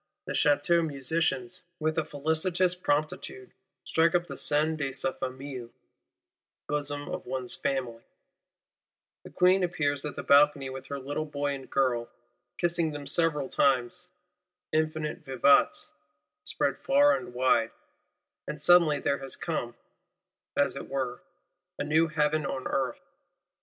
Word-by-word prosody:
The - - -4
Château 150 +4 +3
Musicians, 165 +5 -1 0.2
with 155 0 0
a - - 0
felicitous 160 +5 0
promptitude, 180 - -2 0.3
strike 165 +1 +2
up 175 0 +2
the - - -8
Sein 155 +2 +2
de 140 -3 -2
sa 135 0 -2
Famille 130 -2 -6 1.0
(Bosom 145 -1 -2
of - - -6
one's 130 -1 -2
Family): 130 -5 -3 1.2
the - - -10
Queen 185 +1 +3
appears 145 -5 -1
at 150 - -5
the - - -5
balcony 140 -1 +4
with 135 0 -8
her 140 - -4
little 145 +3 -4
boy 145 -1 -2
and 135 -1 -8
girl, 125 -3 0 0.5
"kissing 170 -1 +1
them 145 -1 -7
several 150 -1 +2
times;" 135 +7 +1 0.6
infinite 155 +1 -1
Vivats 145 - +3 0.5
spread - - -1
far 285 +1 +4
and 120 - -7
wide;—and 130 +4 -3
suddenly 160 -2 +5
there 140 +1 0
has 135 -1 -2
come, 120 -8 -3 0.8
as 140 -2 +2
it 140 - -7
were, 130 0 -3 0.6
a - - -2
new 155 +3 +3
Heaven 155 0 +1
on 130 -1 -3
Earth. 135 -2 -2
145 Hz, 130 wpm, -28 LUFS, 135-165 Hz, 1.2 s, suddenly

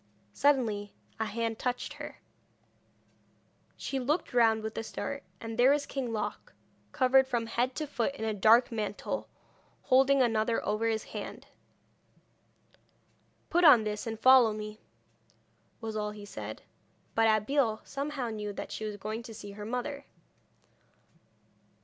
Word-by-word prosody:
Suddenly 225 -8 +1 0.2
a 220 - 0
hand 225 +1 -2
touched 250 -1 -2
her. - - -8 1.6
She 270 - -3
looked 290 +6 -1
round 225 -2 +4
with 220 0 -4
a - - -3
start, 280 +5 -5 0.2
and 225 0 -6
there 250 +2 +7
was 285 0 +2
King 265 -5 -3
Loc, 220 - -4 0.4
covered 265 -1 +4
from 240 -3 -1
head 245 +3 -1
to 310 - -2
foot 275 -1 -2
in 220 - -4
a 220 - 0
dark 220 +5 +5
mantle, 210 -2 -3 0.5
holding 270 +1 +4
another 225 -1 +1
over 215 +2 0
his 220 -1 -1
arm. - - -6 2.1
'Put 350 +1 +3
on 270 -9 +8
this 210 +1 -3
and 225 -1 -4
follow 255 -3 +7
me,' 215 0 -7 1.0
was 220 -1 -4
all 210 -1 -1
he 210 -1 -9
said. 110 - -7 0.5
But 225 0 +4
Abeille 220 +1 +2
somehow 280 -3 -3
knew 210 -2 -4
that - - -6
she 220 - -4
was 210 -1 -4
going 215 +3 -4
to 230 -2 -10
see 205 -1 -8
her 205 +1 -8
mother. 260 +5 -4
225 Hz, 145 wpm, -30 LUFS, 215-260 Hz, 2.1 s, on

